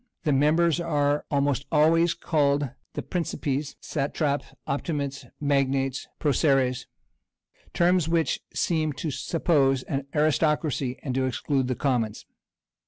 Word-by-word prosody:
The 150 -3 +2
members 155 +4 +3
are 145 -3 0
almost 140 -1 0
always 165 +2 +4
called 145 -5 +1 0.2
the - - -4
"principes, 145 -5 -2
satrapæ, 145 0 -1 0.2
optimates, 140 -1 -3
magnates, 135 -2 0
proceres;" 135 -3 +1 0.9
terms 175 -2 +3
which 165 -4 +1
seem 155 -3 0
to 155 +3 -4
suppose 135 -2 +1
an 135 -1 -3
aristocracy, 150 -3 +1
and 135 -5 -2
to 130 0 +1
exclude 130 +1 -1
the 130 - -1
commons. 120 -7 -1
145 Hz, 110 wpm, -26 LUFS, 135-155 Hz, 0.9 s, always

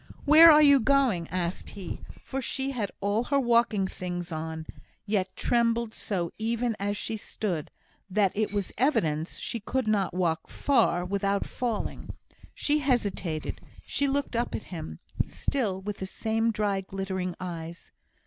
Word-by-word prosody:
"Where 315 +3 +10
are 305 0 +7
you 280 -2 +7
going?" 250 - +2
asked 175 0 -3
he; 190 -4 -7 0.3
for 270 0 -3
she 265 +2 -2
had 225 -7 -2
all 205 +4 +1
her 280 +1 +2
walking 235 -5 +3
things 175 -2 -5
on, 160 0 -4 0.4
yet 200 -3 -1
trembled 235 -1 +1
so, 175 -5 -2
even 230 +1 0
as 205 +1 -1
she 220 - -3
stood, 185 -7 -3 0.4
that 195 0 +3
it 215 0 0
was 205 -2 -2
evident 160 - +2
she 230 - -4
could 245 +3 -2
not 200 -4 +1
walk 170 -3 0
far 180 -10 +2
without 200 +1 0
falling. 235 -4 -3 0.4
She 300 +1 +2
hesitated 205 - -1 0.2
she 280 - 0
looked 275 -2 -1
up 235 +1 0
at - - -5
him, 80 - -6 0.3
still 205 -9 -2
with 205 0 -4
the 190 - -3
same 225 +3 0
dry 210 -3 0
glittering 190 -2 -3
eyes. 170 -2 -7
205 Hz, 150 wpm, -28 LUFS, 185-240 Hz, 0.4 s, Where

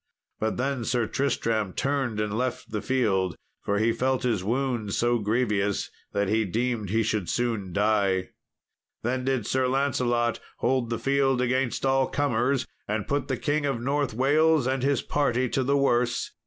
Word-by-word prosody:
But 110 0 -1
then 130 -1 -1
Sir 120 0 +1
Tristram 110 -5 -1
turned 135 -6 -1
and 105 -1 -1
left 125 0 -3
the 105 -1 -2
field, 100 -9 +1 0.3
for 100 - -1
he 110 +2 +3
felt 130 +3 0
his 115 -7 0
wound 120 -2 -1
so 120 0 +2
grievous 105 -2 0 0.2
that 100 0 0
he 110 +3 +2
deemed 115 +1 -1
he 110 +3 +2
should 105 -5 -1
soon 115 -6 -1
die. 100 -2 +1 0.7
Then 130 +2 -1
did 130 -5 0
Sir 130 -1 +1
Lancelot 125 -3 +1 0.2
hold 125 -1 0
the 115 - -1
field 135 -2 +2
against 125 +1 0
all 135 0 +3
comers, 130 -1 0 0.2
and 105 0 -2
put 145 0 -1
the 130 - -1
King 145 -1 0
of 135 -4 -1
North 140 -1 -1
Wales 150 +3 +3
and 130 0 0
his 140 -1 +1
party 130 -3 +1
to 135 - 0
the 140 +2 +2
worse. 120 -3 +1
120 Hz, 170 wpm, -26 LUFS, 110-135 Hz, 0.7 s, he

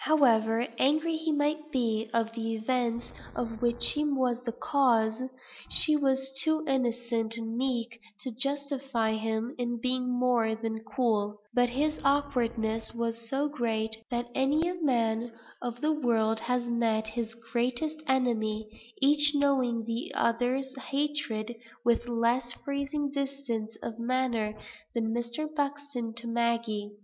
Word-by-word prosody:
However 230 -6 +4
angry 310 +4 +3
he 320 0 -1
might 300 +1 0
be 225 -4 0
with 230 -1 0
the 225 -1 -2
events 235 +1 -1 0.2
of 230 -2 -4
which 240 0 +3
she 295 - +5
was 260 -4 +1
the 235 - -2
cause, 235 -4 +2 0.5
she 305 - +8
was 270 -2 +2
too 315 0 +1
innocent 240 -3 0
and 225 0 -4
meek 235 -2 -1 0.2
to 255 - -4
justify 270 -3 -1
him 220 +2 -2
in 240 -1 -1
being 255 +1 0
more 245 -3 +2
than 225 0 -3
cool; 215 -2 0 0.2
but 245 0 +3
his 300 +5 0
awkwardness 235 -6 0
was 230 0 -3
so 275 +3 +1
great, 225 -6 0
that 240 0 -3
many 285 +6 +2
a 355 - -1
man 230 -3 +1 0.3
of 240 0 -5
the 310 +1 +2
world 225 -6 +1
has 250 +1 0
met 230 -2 +1
his 225 0 -4
greatest 245 +7 -2
enemy, 220 -5 +1 0.4
each 295 +1 +5
knowing 260 -5 +2
the 230 +1 -3
other's 250 +3 +1
hatred, 265 -5 -2 0.3
with 235 0 +2
less 240 +1 +1
freezing 280 +1 -2
distance 270 -6 -3
of 225 0 -5
manner 235 -3 0 0.4
than 225 -1 0
Mr. 240 +6 -2
Buxton's 285 -5 -3
to 235 0 -4
Maggie. 230 -3 0
240 Hz, 140 wpm, -29 LUFS, 225-275 Hz, 0.5 s, she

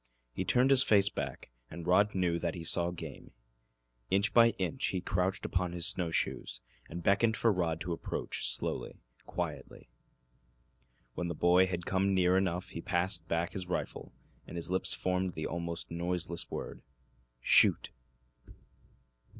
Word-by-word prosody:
He - - -2
turned 125 +2 +3
his 135 -1 +8
face 100 -5 +4
back, 70 - -6 0.2
and 85 +1 -8
Rod 100 +4 +3
knew 85 -2 +1
that 85 -1 -2
he 85 - -6
saw 85 +1 +3
game. 90 - -9 0.8
Inch 100 +2 +2
by 115 -1 +7
inch 130 +9 -1
he 95 - -1
crouched 90 +1 -1
upon 90 -2 -1
his 85 -2 -2
snow 90 -3 +1
shoes, 80 - -2 0.3
and 85 +1 -7
beckoned 110 +3 +3
for 115 -2 +3
Rod 85 -3 -1
to 90 - -2
approach, - - -3
slowly, - - -2 0.2
quietly. - - -6 1.2
When 90 - -3
the 85 - -4
boy 90 +3 +4
had 90 -2 -4
come 95 +1 +1
near 90 0 +3
enough 95 -2 0
he 85 - -7
passed 85 -1 -1
back 85 +1 -1
his 95 -2 -4
rifle, 90 - -4 0.4
and - - -9
his 85 +1 -3
lips 95 - +1
formed 90 0 -1
the 80 - -4
almost 85 0 -5
noiseless 85 0 -2
word, - - -6 0.6
"Shoot!" - - +4
90 Hz, 155 wpm, -31 LUFS, 85-95 Hz, 1.2 s, his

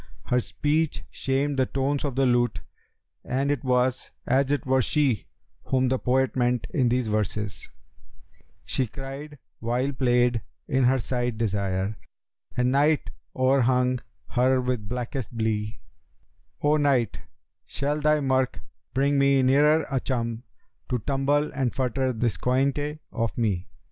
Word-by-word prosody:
Her 125 - +2
speech 145 - -1
shamed 135 +1 -1
the 130 - +3
tones 140 +1 -1
of 140 -4 -2
the 135 0 +3
lute, 120 -2 +2 0.6
and 135 +3 0
it 145 -4 -2
was 125 0 +1 0.2
as 135 +2 +2
it 145 +1 0
were 130 0 +3
she 135 - +1 0.4
whom 130 -1 +2
the 130 0 +1
poet 130 +1 +1
meant 125 -2 +1
in 130 -4 +2
these 125 -1 +1
verses, 105 -2 -2 1.0
'She 130 - 0
cried 140 +5 -8 0.2
while 125 +4 0
played 125 -2 +2 0.3
in 130 -1 +2
her 130 +2 +4
side 120 -1 -2
Desire, 100 -2 -1 0.3
* - - -33
And 125 0 +2
Night 145 +2 +2 0.2
o'er 130 +1 +3
hung 125 0 +2 0.3
her 130 +1 +3
with 125 -5 -2
blackest 125 -1 -4
blee:— 110 -1 -1 0.8
'O 150 +1 +4
Night 135 -7 +1 0.5
shall 145 +2 -2
thy 150 0 +3
murk 130 -1 +1 0.4
bring 140 +1 +2
me 140 -1 +4
ne'er 150 +4 +4
a 135 - +1
chum 115 -3 -2 0.2
* - - -46
To 125 - +1
tumble 140 +4 0
and 130 -4 -1
futter 130 0 0
this 115 -5 +1
coynte 140 +4 0
of 115 -2 -2
me?' 100 -6 0
130 Hz, 145 wpm, -26 LUFS, 120-140 Hz, 1.0 s, her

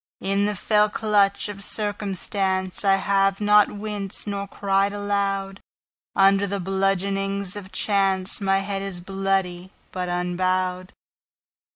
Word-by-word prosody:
In 195 +1 0
the 210 - -2
fell 210 +1 +2
clutch 205 -2 +1
of 205 -1 -6
circumstanceI 195 -2 -1
have 195 0 +2
not 210 0 +5
winced 205 -1 -5
nor 200 -1 -3
cried 195 0 0
aloud. 200 -1 -1 0.6
Under 195 +1 +4
the 200 +1 -2
bludgeonings 195 +1 -1
of 195 -2 -8
chanceMy 195 0 +1
head 195 0 -3
is 195 -2 -4
bloody, 190 -1 -2 0.2
but 180 -1 -3
unbowed. 185 +1 -1
195 Hz, 110 wpm, -24 LUFS, 190-200 Hz, 0.6 s, not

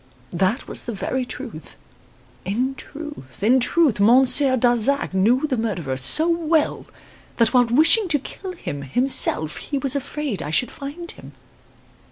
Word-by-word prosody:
That 190 +8 -1
was - - -4
the 235 - -4
very 250 +6 -3
truth. 240 - -9 0.7
In 245 +8 -2
truth, 290 - -10
in 250 +5 +4
truth, 265 -2 +2
Monsieur 260 +5 +4
Darzac 245 +1 +1
knew 230 +9 +2
the 270 -4 -2
murderer 185 -12 -3
so 135 - +5
well 330 -2 0 0.5
that 230 0 +2
while 250 -1 +5
wishing 320 - +3
to 315 -4 +1
kill 370 +7 -8
him 145 - -6
himself 155 - +1
he 285 - -4
was 275 0 -2
afraid 280 - -4
I - - -5
should 205 +10 0
find 300 +5 -8
him. - - -14
255 Hz, 150 wpm, -21 LUFS, 210-290 Hz, 0.7 s, so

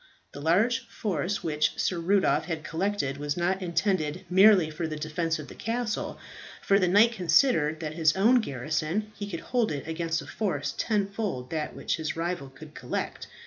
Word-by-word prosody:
The 145 - -9
large 205 +10 +2
force 190 -1 -2
which 155 -1 +1
Sir 175 - 0
Rudolph 195 +3 +2
had 160 -3 -4
collected 165 -5 -1
was 145 +1 -3
not 185 +2 0
intended 170 -2 -1
merely 190 -4 +6
for 160 +2 -3
the 155 - -4
defence 160 +2 -2
of 150 -2 -8
the - - -10
castle, 230 0 -3 0.5
for 200 0 +4
the 185 - +2
knight 205 +6 +5
considered 165 - +2
that 155 - -2
with 160 - -9
his 155 -1 +4
own 235 +6 +5
garrison 155 - -2
he 205 -1 -6
could 170 -4 -5
hold 245 -3 0
it 145 0 -5
against 165 0 -1
a 140 - -8
force 145 -2 -2
tenfold 200 - -2
that 155 -2 -3
which - - -2
his 160 -1 -3
rival 165 -4 -3
could 135 - -13
collect. - - -4
170 Hz, 185 wpm, -27 LUFS, 155-200 Hz, 0.5 s, merely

